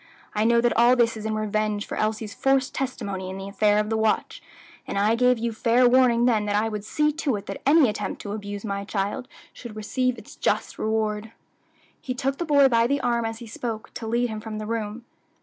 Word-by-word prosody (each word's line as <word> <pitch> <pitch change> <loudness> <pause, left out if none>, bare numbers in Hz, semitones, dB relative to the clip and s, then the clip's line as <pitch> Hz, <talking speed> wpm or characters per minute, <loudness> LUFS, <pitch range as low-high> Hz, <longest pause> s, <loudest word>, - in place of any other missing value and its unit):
I 215 +1 +1
know 235 0 +4
that 240 0 +2
all 240 +2 +5
this 235 -2 +2
is 220 0 -5
in 215 - -1
revenge 215 -1 -1
for - - -5
Elsie's 215 -1 -2
forced 270 -1 +1
testimony 200 -8 -4
in 190 - -6
the 195 0 -6
affair 205 +1 +2
of 210 +1 0
the 220 - +1
watch, 220 0 0 0.5
and - - -3
I 210 +3 +3
gave 250 +1 +3
you 230 0 -2
fair 240 +3 +3
warning 240 -1 +4
then 220 -4 +2
that 205 0 0
I 215 +2 +1
would 210 -2 -5
see 300 +7 +1
to 295 -5 -1
it 200 - -6
that 195 - -6
any 295 -1 +6
attempt 210 - -3
to 205 - -5
abuse 205 0 -5
my 200 -1 -3
child 200 +4 -3 0.3
should 235 -3 -10
receive 250 +4 -1
its 220 - -12
just - - -1
reward." 220 0 -1 0.7
He 255 - -4
took 270 +1 -2
the 345 - -1
boy 285 -3 +5
by 230 -2 +3
the 280 +2 +1
arm 235 -2 0
as 225 0 -3
he 235 - -9
spoke, 225 0 -6
to 225 - -6
lead 240 +2 +1
him 215 0 -5
from 220 -1 -6
the 215 - -5
room. 225 +1 -4
225 Hz, 230 wpm, -25 LUFS, 210-245 Hz, 0.7 s, any